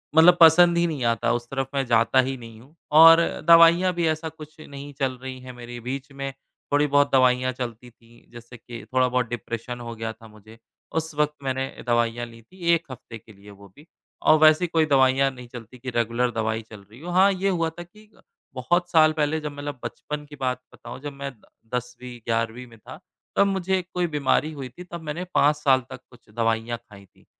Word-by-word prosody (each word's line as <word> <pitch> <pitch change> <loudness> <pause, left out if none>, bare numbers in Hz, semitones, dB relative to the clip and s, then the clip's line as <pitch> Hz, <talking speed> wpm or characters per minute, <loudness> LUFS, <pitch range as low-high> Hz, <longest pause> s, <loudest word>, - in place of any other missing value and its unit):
मतलब 175 +2 +7
पसंद 170 +1 +7
ही 170 - +3
नहीं 145 -6 -4
आता, 115 0 +1
उस 120 0 -3
तरफ 135 -1 -3
मैं 135 -1 0
जाता 115 +1 +3
ही 135 - -3
नहीं 115 -2 -12
हूँ, 140 +6 -21 0.2
और 165 +2 +8 0.3
दवाइयाँ 170 +2 +6
भी 170 -1 0
ऐसा 160 +1 -2
कुछ 155 0 -14
नहीं 140 -1 -10
चल 130 -2 -1
रही 130 -1 -7
है 130 0 -9
मेरी 120 0 -9
बीच 135 +4 -6
में 135 0 -5 0.4
थोड़ी-बहुत 145 0 +3
दवाइयाँ 130 -1 +3
चलती 120 -1 -7
थी। 115 0 -23
जैसे 120 +1 -12
कि 120 0 -10
थोड़ा-बहुत 125 -2 +1
डिप्रेशन 120 0 -6
हो 115 -1 -7
गया 115 0 -4
था 115 - -16
मुझे। 110 +1 -17 0.4
उस 160 -1 -2
वक़्त 150 0 +1
मैंने 130 0 -1 0.2
दवाइयाँ 120 0 0
ली 115 -1 -14
थी 185 +12 -22 0.2
1 170 0 -1
हफ्ते 120 -2 -10
के 110 0 -18
लिए 100 +1 -17
वो 100 0 -15
भी, 150 +3 -18 0.3
और 155 - +5
वैसे 155 +3 +5
कोई 160 -1 +2
दवाइयाँ 135 -1 +3
नहीं 125 -2 -12
चलती 120 0 -11
कि 130 +1 -6
रेगुलर 120 +1 0
दवाई 110 -1 -2
चल 105 -2 -11
रही 115 - -14
हो। 175 - -6
हाँ, 190 +3 +5
ये 195 +1 -1
हुआ 165 -3 0
था 175 +2 -10
कि 210 +4 -20
अ, - - -22 0.3
बहुत 175 +8 0
साल 155 -2 +5
पहले 155 0 0
जब 150 -1 -5
मतलब 145 -1 -7
बचपन 150 +5 -6
की 145 0 -12
बात 125 -1 -1
बताऊँ, - - -10
जब 145 -1 -6
मैं 140 0 -6
द - - -25 0.3
10वीं-11वीं 120 -1 -4
में 115 -1 -17
था, - - -12 0.4
तब 200 - +4
मुझे 190 -1 0
कोई 180 -1 0
बीमारी 150 +1 0
हुई 135 -4 -7
थी, 180 +9 -12
तब 170 -1 -9
मैंने 160 +3 -5
5 145 +2 +4
साल 135 -3 +2
तक - - -9
कुछ 120 -3 -20
दवाइयाँ 115 +1 -1
खाई 105 -4 -17
थी। 95 - -28
130 Hz, 210 wpm, -24 LUFS, 120-155 Hz, 0.4 s, और